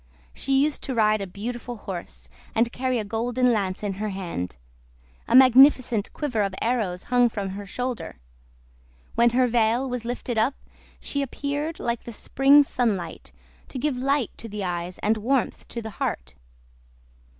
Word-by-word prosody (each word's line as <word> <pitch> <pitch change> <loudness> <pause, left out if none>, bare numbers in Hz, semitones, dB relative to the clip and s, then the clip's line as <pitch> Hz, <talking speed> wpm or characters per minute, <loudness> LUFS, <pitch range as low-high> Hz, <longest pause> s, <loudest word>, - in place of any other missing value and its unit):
She 270 0 +2
used 300 0 -1
to 260 - -4
ride 215 -2 +3
a 195 - -4
beautiful 240 +5 -6
horse, 170 - -8 0.3
and 235 +1 +2
carry 255 0 -1
a 215 - -2
golden 240 +3 +1
lance 195 -2 -2
in 205 -2 -1
her 215 - -1
hand; 170 - -5 0.7
a - - +2
magnificent 255 -3 +6
quiver 255 -8 -2
of 195 -2 -1
arrows 215 -7 -1
hung 245 -1 +5
from 200 -3 -4
her 200 +1 -7
shoulder. 250 +3 -4 1.0
When 235 +1 +4
her 250 +2 +3
veil 235 +2 +2
was 250 -2 -3
lifted 240 -1 -2
up 255 +6 +2 0.4
she 280 - -2
appeared 285 +4 -3
like 235 -1 -2
the 235 - -6
spring 275 +6 +5
sunlight, 210 -11 -2 0.4
to - - -7
give 285 +1 0
light 270 -1 0
to 230 - -8
the 210 -1 -4
eyes 175 0 -3
and 220 +1 +2
warmth 245 +3 -1
to 235 - -6
the 220 - -6
heart. 65 - -3
235 Hz, 160 wpm, -25 LUFS, 205-255 Hz, 1.0 s, magnificent